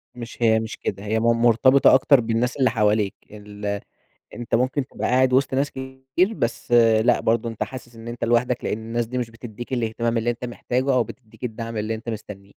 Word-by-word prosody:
مش 120 -1 -8
هي 110 -1 +4
مش 110 0 -6
كده، 100 0 -4
هي 110 +2 0
مرتبطة 115 +3 +4
أكتر 135 +1 +5
بالناس 115 +2 -1
اللي 130 -2 +3
حواليك، 105 -2 +1 0.2
ال 105 -1 -5 0.5
أنت 120 -1 -2
ممكن 130 +3 0
تبقى - - -4
قاعد 130 0 +3
وسط 130 0 +2
ناس 140 +2 0
كتير 130 +9 -2
بس، 120 - -3 0.3
لأ، - - +3
برضه 115 +1 0
أنت 115 - -3
حاسس 120 -2 -10
إن 115 +1 -11
أنت 120 +1 -6
لوحدك، 120 +1 +1
لأن 105 - -1
الناس 115 +1 -3
دي 125 +3 -5
مش 120 -2 -2
بتديك 120 +2 -9
الإهتمام 115 0 -1
اللي 115 +1 0
أنت 120 +1 -3
محتاجه 125 +2 -1
أو 125 -2 +3
بتديك 110 +2 -14
الدعم 115 -1 -5
اللي 110 +1 -2
أنت 115 +1 -7
مستنيه. 105 -3 -8
115 Hz, 195 wpm, -23 LUFS, 110-125 Hz, 0.5 s, أكتر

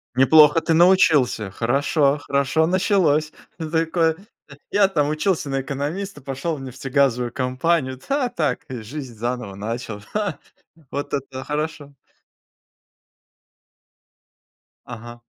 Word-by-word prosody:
Неплохо 150 +4 +6
ты 165 - +1
научился. 160 - +4
Хорошо 140 - +1
хорошо 140 +3 +1
началось. 175 -5 +2 0.3
Такой: 160 0 0 0.6
"Я 200 -1 +4
там 150 -6 0
учился 155 0 0
на 135 0 -1
экономиста, 145 +6 -4
пошел 135 +5 -3
в 140 - -9
нефтегазовую 130 -1 0
компанию. 130 +2 0
Да, 275 -3 +1
так, 160 -9 -1
э, 125 -3 -5
жизнь 130 +2 -8
заново 120 -2 -4
начал. 110 +1 -5
Ха!" 210 -2 -2 0.5
Вот 145 - -4
это 135 -2 -4
хорошо! 150 -1 -4 2.9
Ага. 120 0 -10
145 Hz, 105 wpm, -22 LUFS, 130-160 Hz, 2.9 s, Неплохо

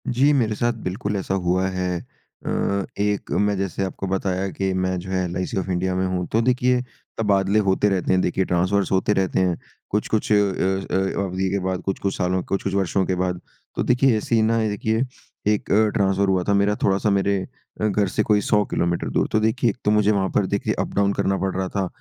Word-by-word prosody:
जी, 135 +4 +3
मेरे 115 -6 +1
साथ 120 +2 +1
बिल्कुल 100 +3 -3
ऐसा 95 0 -2
हुआ 95 0 +1
है। 90 -1 -2 0.5
अ, 100 -1 0
एक 105 0 -1
मैं 105 0 +2
जैसे 95 0 -2
आपको 95 0 -4
बताया 95 0 -1
कि 95 +4 -2
मैं 95 0 0
जो 95 +2 -8
है 95 -1 0
एलआईसी 90 +2 -3
ऑफ 95 - -2
इंडिया 90 0 0
में 95 0 0
हूँ, 90 -1 -1
तो 115 - +3
देखिए, 125 +1 +2 0.4
तबादले 100 -1 +2
होते 95 +2 +3
रहते 95 -2 0
हैं, 90 - +3
देखिए 95 +1 0
ट्रांसफ़र्स 90 +2 +1
होते 95 +2 +2
रहते 95 -2 0
हैं, 90 -2 +1 0.3
कुछ-कुछ 105 +1 -1
अ - - +6
अ 95 -1 +1
अ, 95 +1 0
अवधि 95 0 -2
के 100 +1 0
बाद, 95 -1 -1
कुछ-कुछ 95 0 -2
सालों 90 0 0
कुछ-कुछ 95 0 -2
वर्षों 95 0 +1
के 95 - 0
बाद। 90 -1 -1 0.4
तो - - 0
देखिए, 125 -1 +3
ऐसे 110 +2 -1
ही 110 - +4
ना 115 +1 +2
देखिए, 110 +3 0 0.4
एक 105 -1 0
अ, 110 +2 +4
ट्रांसफ़र 100 -1 +1
हुआ 95 -1 +2
था 100 - +3
मेरा 100 +1 +2
थोड़ा-सा 100 +2 +2
मेरे 100 0 +2 0.4
अ, - - +2
घर 105 -1 +1
से 105 +4 0
कोई 105 -1 +2
100 105 0 +2
किलोमीटर 85 0 0
दूर। - - +1
तो 110 - +3
देखिए, 110 +3 +1
एक 110 - -4
तो 105 - +4
मुझे 105 0 +3
वहाँ 95 -2 +1
पर 100 - +3
देखिए - - -1
अप-डाउन 100 0 +1
करना 95 0 0
पड़ 95 -1 -2
रहा 95 0 -1
था, 95 -1 -1
95 Hz, 220 wpm, -22 LUFS, 95-105 Hz, 0.5 s, अ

